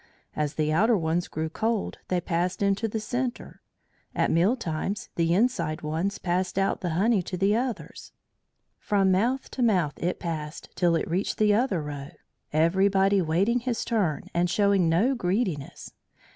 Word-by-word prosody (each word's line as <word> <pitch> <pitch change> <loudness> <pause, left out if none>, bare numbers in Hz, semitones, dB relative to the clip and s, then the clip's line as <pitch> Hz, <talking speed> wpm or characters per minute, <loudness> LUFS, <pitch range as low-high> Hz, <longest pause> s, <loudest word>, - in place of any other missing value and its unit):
As 150 -1 -2
the 155 0 0
outer 220 +7 +4
ones 165 0 -1
grew 160 +1 -3
cold 220 +6 -2
they 180 - +1
passed 175 +3 -1
into 200 +3 +1
the 220 +1 -3
centre; 245 +3 -4 0.5
at - - +1
meal 180 +9 +3
times 190 -2 -4
the 165 -1 +1
inside 175 -9 0
ones 165 +6 -2
passed 180 +1 -1
out 195 0 +1
the 180 - -2
honey 215 +1 +3
to 180 +1 -5
the 195 +3 +2
others. 245 0 -4 0.7
From 195 -3 +2
mouth 240 +8 0
to 260 - -4
mouth 185 - +2
it 180 +2 -1
was - - -32
passed 155 -2 -5
till 175 -2 +2
it - - -1
reached 180 +5 -1
the 210 -1 +4
other 205 - +1
row, 145 -1 -6 0.4
everybody 190 +5 +3
waiting 185 +9 +1
his 240 -1 -2
turn 200 - 0
and 175 +1 +1
showing 200 -3 +3
no 205 +12 +3
greediness. 185 - -2
190 Hz, 165 wpm, -26 LUFS, 165-215 Hz, 0.7 s, outer